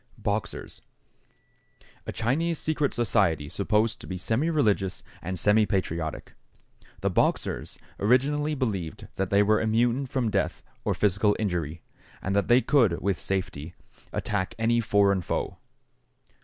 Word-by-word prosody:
=Boxers.= 105 0 -3 1.3
A - - -2
Chinese 155 +9 0
secret 150 -2 0
society 100 -10 +1
supposed 105 +6 0
to - - -9
be 95 - -4
semireligious 110 - +1 0.2
and 90 +1 -4
semipatriotic. 95 -6 +1 0.7
The - - +1
Boxers - - 0 0.2
originally 145 +7 +2
believed 100 - -3
that 95 -1 -1
they 100 +1 +4
were 110 +1 +3
immune 120 +4 +1
from 125 -4 -1
death - - -1 0.2
or - - 0
physical 105 +1 +2
injury, 85 -6 -2 0.4
and 100 +1 -2
that 100 - +2
they 120 +2 +6
could, 115 - +3
with 100 -2 -1
safety, 90 -4 -3 0.4
attack 105 +2 -2
any 115 +1 +2
foreign 100 -3 +3
foe. - - -3
105 Hz, 125 wpm, -27 LUFS, 95-120 Hz, 1.3 s, they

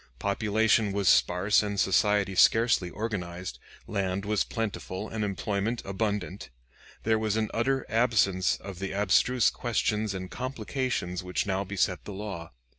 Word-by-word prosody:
Population 110 - +2
was 100 -2 0
sparse 90 +4 +4
and 100 -1 -3
society 100 +1 +2
scarcely 110 -2 +4
organized, 90 -4 -5 0.3
land 100 -1 -2
was 105 0 +1
plentiful 105 -3 -4
and 110 -1 -3
employment 100 +3 -2
abundant. 100 -2 -3 0.5
There 110 0 +2
was 110 -1 0
an 110 -1 -1
utter 135 +3 0
absence 110 -6 +2
of 95 -3 -9
the 95 0 -4
abstruse 105 +5 +3
questions 110 -3 -1
and 95 -1 -6
complications 130 -6 -3
which 90 0 -2
now 95 -1 0
beset 95 -2 -1
the 105 - -6
law. 95 -5 -6
100 Hz, 135 wpm, -28 LUFS, 95-110 Hz, 0.5 s, sparse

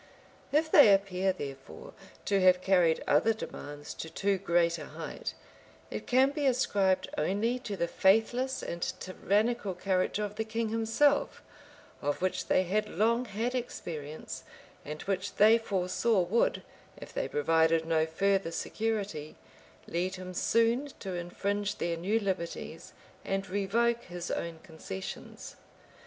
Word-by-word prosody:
If 315 +2 +2
they 225 -8 +9
appear, 195 -1 +2
therefore, 135 - -8 0.3
to 200 -1 +2
have 185 0 +6
carried 175 -4 +3
other 185 +10 +4
demands 145 -8 -7
to 160 - -7
too 195 +3 0
great 170 -2 +2
a 150 - -7
height, 160 +1 -6 0.6
it - - -5
can 260 +2 +4
be 290 -1 0
ascribed 195 -7 +2
only 205 +10 0
to 205 -5 -5
the 170 - 0
faithless 240 +9 +2
and 170 - -5 0.2
tyrannical 205 +2 0
character 185 +2 0
of 210 0 -5
the 220 - 0
king 225 0 -2
himself, 225 +6 +1 0.6
of 145 0 -1
which 185 0 -1
they 185 - +3
had 210 +4 0
long 235 +3 +1
had 230 +3 -2
experience, 155 - -5 0.4
and 150 +1 -6
which 195 0 -2
they 220 +3 +6
foresaw 195 +1 +1
would, 195 +7 +1 0.3
if - - -11
they - - -1
provided 160 +2 +2
no 160 -1 +2
further 195 +2 +1
security, 205 -4 -3 0.5
lead 180 +2 -2
him 185 0 -7
soon 230 +8 +2
to 190 -2 -5
infringe 200 +4 -2
their 170 0 -1
new 195 +7 0
liberties, 190 -5 -4 0.3
and 195 0 -2
revoke 230 +4 +1
his 175 0 -6
own 170 -1 -3
concessions. 160 - -8
195 Hz, 140 wpm, -30 LUFS, 170-225 Hz, 0.6 s, they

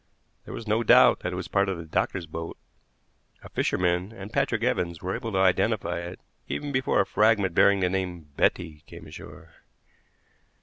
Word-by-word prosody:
There - - -8
was 115 - -7
no 110 +2 +2
doubt 115 - +6
that 90 - -4
it - - -4
was 90 -1 -5
part 100 +3 +1
of 95 - -2
the 85 - -8
doctor's 85 +3 -1
boat. 80 +1 -7 0.9
A - - -11
fisherman 90 +2 0
and 100 -2 -10
Patrick - - 0
Evans 85 -1 -1
were 95 +1 -3
able 115 - -4
to - - 0
identify 95 -2 +1
it 85 +1 -7 0.3
even 145 -1 -4
before 130 -1 +2
a - - 0
fragment 105 -3 +2
bearing 100 +2 +4
the 90 - +2
name 90 -3 -3
Betty 75 -1 0
came - - -11
ashore. - - -12
95 Hz, 180 wpm, -26 LUFS, 85-100 Hz, 0.9 s, doubt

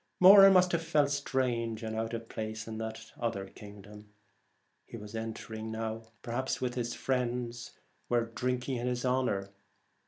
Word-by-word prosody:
Moran 195 +1 +10
must 180 -1 +5
have 170 - +1
felt 150 -3 +2
strange 120 -5 -1
and 110 0 -3
out 115 +1 -2
of 115 0 -7
place 110 0 -5
in 110 -1 -5
that 110 0 -6
other 115 -5 -2
kingdom 105 +1 -13 0.7
he - - -10
was 105 0 -10
entering, 110 0 -5 0.5
perhaps 125 +2 -2
while 125 -1 -1
his 120 -1 -3
friends 125 -2 -2 0.4
were 120 -1 +2
drinking 125 +2 -2
in 120 +1 -2
his 125 0 -1
honour. 125 -7 0
120 Hz, 150 wpm, -31 LUFS, 110-125 Hz, 0.7 s, Moran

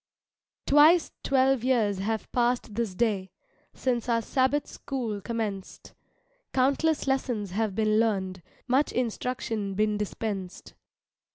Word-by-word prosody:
Twice 310 +4 +5
twelve 265 -2 +2
years 225 -7 +2
have 220 +3 -3
passed 240 -2 0
this 220 -4 -2
day, 200 -4 0 0.5
Since 245 -2 -1
our 230 -1 +2
Sabbath 265 +4 +1
School 235 -7 -4
commenced; 210 -3 -5 0.6
Countless 280 +4 +2
lessons 245 -7 -1
have 210 0 -1
been 215 0 +2
learned, 190 -5 0 0.3
Much 265 +4 +2
instruction 225 -4 -2
been 210 0 +1
dispensed. 200 -3 -5
230 Hz, 110 wpm, -27 LUFS, 205-260 Hz, 0.6 s, Twice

